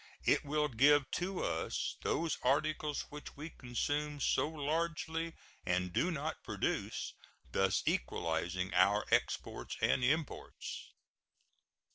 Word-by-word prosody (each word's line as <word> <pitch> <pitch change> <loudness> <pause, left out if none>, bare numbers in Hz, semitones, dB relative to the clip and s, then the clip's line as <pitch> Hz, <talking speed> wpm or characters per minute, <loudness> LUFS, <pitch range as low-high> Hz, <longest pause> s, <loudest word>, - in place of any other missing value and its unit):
It - - +4
will 150 +1 +1
give 140 +2 +4
to 185 +1 -1
us - - -1
those 165 -2 0
articles 150 +2 +1
which 150 -1 -9
we 155 +3 -6
consume 145 +4 -2
so 150 - +2
largely 160 +2 -1 0.3
and 90 0 0
do 175 - +2
not 155 -1 -3
produce, - - -2 0.4
thus 95 -1 +2
equalizing 85 +7 0
our 100 +3 +4
exports - - 0
and 130 - +3
imports. 150 +4 -2
145 Hz, 110 wpm, -35 LUFS, 115-155 Hz, 0.4 s, It